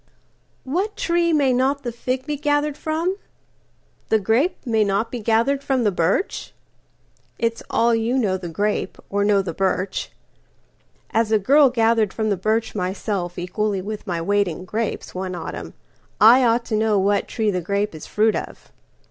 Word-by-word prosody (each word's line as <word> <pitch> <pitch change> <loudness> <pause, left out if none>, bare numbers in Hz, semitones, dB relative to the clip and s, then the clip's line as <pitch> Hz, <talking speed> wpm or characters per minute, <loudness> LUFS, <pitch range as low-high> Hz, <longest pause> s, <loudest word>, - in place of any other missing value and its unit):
WHAT 370 +10 -2
tree 340 0 +1
may 280 -5 +3
not 270 +3 +1
the 240 - -3
fig 255 +2 -3
be 300 0 -2
gathered 290 0 0
from? 325 +5 -2 0.9
The 220 - +4
grape 225 - +1
may 225 -3 +2
not 205 +3 0
be 245 - -4
gathered 230 +6 +1
from 265 -3 +1
the 210 - +2
birch? 180 - -1 0.8
It's 230 0 -1
all 235 +1 +2
you 230 +3 +1
know 205 -7 +1
the 180 -2 -5
grape, 205 +6 -2
or 200 0 +1
know 200 -1 +3
the 175 -3 -4
birch. 190 +1 -1 1.0
As 225 -1 +1
a 220 - +5
girl 275 +7 +5
gathered 225 -4 +2
from 215 -1 -1
the - - +2
birch 215 +4 -1
myselfEqually 190 0 -2
with 215 +1 -6
my 175 -2 -1
weight 200 +4 +1
in 175 +2 -6
grapes, 220 +3 -3
one 185 0 -4
autumn,I 225 +7 +1
ought 235 0 +2
to 220 - -2
know 215 -1 +2
what 200 +1 +1
tree 220 -3 0
the 180 -2 -2
grape 200 +3 -1
is 155 - -9
fruit 215 +1 +2
of. - - -7
220 Hz, 165 wpm, -22 LUFS, 200-255 Hz, 1.0 s, a